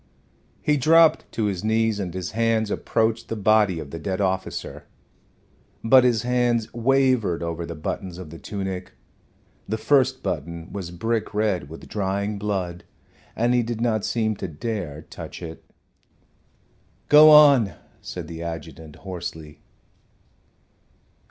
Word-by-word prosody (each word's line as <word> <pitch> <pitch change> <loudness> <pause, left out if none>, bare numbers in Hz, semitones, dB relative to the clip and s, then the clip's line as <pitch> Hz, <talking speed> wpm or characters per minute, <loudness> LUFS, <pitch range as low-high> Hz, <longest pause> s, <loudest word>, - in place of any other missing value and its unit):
He 150 -1 +2
dropped 160 +4 +4
to 110 - -1
his 100 -2 -2
knees, 110 -1 +1
and 95 -3 -3
his 90 0 -5
hands 115 -2 +1
approached 115 0 -1
the 115 - -2
body 105 -3 +3
of 75 -3 -7
the 85 - -6
dead 95 +4 -3
officer. 95 -1 -3 1.0
But 125 +3 +6
his 120 -3 +2
hands 120 -2 0
wavered 120 -7 +2
over 85 0 -4
the 85 - -6
buttons 85 +3 -5
of 90 -4 -9
the 80 - -10
tunic. 95 -2 -5 0.8
The 110 - -1
first 130 +1 +2
button 85 +1 -5
was 95 -4 -5
brick 110 +5 -2
red 100 -9 0
with 80 - -11
drying 100 +1 -2
blood, 95 -4 -3 0.5
and 120 +2 +1
he 125 - +3
did 115 -1 -4
not 110 -3 0
seem 110 -2 0
to - - -4
dare 80 -3 -5
touch - - -9
it. 80 -2 -9 1.4
"Go 150 +1 +8
on," 140 - +7 0.3
said 90 -3 -7
the 85 0 -7
adjutant, 80 -2 -7
hoarsely. 85 -5 -7
105 Hz, 140 wpm, -23 LUFS, 85-115 Hz, 1.4 s, Go